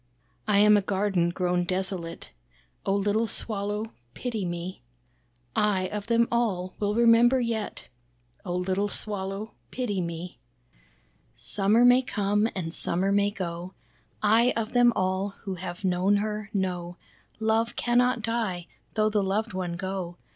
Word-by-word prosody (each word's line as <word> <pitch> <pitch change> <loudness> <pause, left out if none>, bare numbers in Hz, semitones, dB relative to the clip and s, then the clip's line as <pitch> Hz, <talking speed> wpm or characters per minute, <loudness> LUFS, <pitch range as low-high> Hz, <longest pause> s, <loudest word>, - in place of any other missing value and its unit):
"I 210 -2 +3
am 210 +1 +7
a - - +2
garden 190 -3 +1
grown 180 0 0
desolate, 185 - -3 0.6
Oh 195 - +3
little 205 +3 +1
Swallow 210 0 -2 0.2
pity 225 -6 -3
me. 175 +2 -5 0.7
I 200 -3 +2
of 210 -1 -5
them 235 0 +3
all, 195 -6 0
will 205 0 0
remember 235 +2 +5
yet, 230 -3 -3 0.6
Oh 180 -2 -3
little 190 +3 0
Swallow 205 +1 -4 0.2
pity 210 -7 -2
me. 170 +1 -5 1.0
Summer 200 - +2
may 250 +1 +7
come 210 -3 +1
and 165 -4 -3
summer 190 +3 +1
may 205 0 +3
go, 180 -2 -5 0.5
I 225 +4 +5
of 225 +1 -2
them 245 -1 +6
all 190 +2 -1
who 195 - -3
have 175 0 -7
known 185 +2 +2
her, 210 0 -2
know 180 -3 -2 0.4
Love 220 +1 +1
cannot 245 0 +2
die, 220 -7 -1 0.3
though 215 0 +2
the 210 -1 +2
loved 200 +3 -1
one 180 -2 -3
go. 185 -1 -4
200 Hz, 140 wpm, -27 LUFS, 185-220 Hz, 1.0 s, am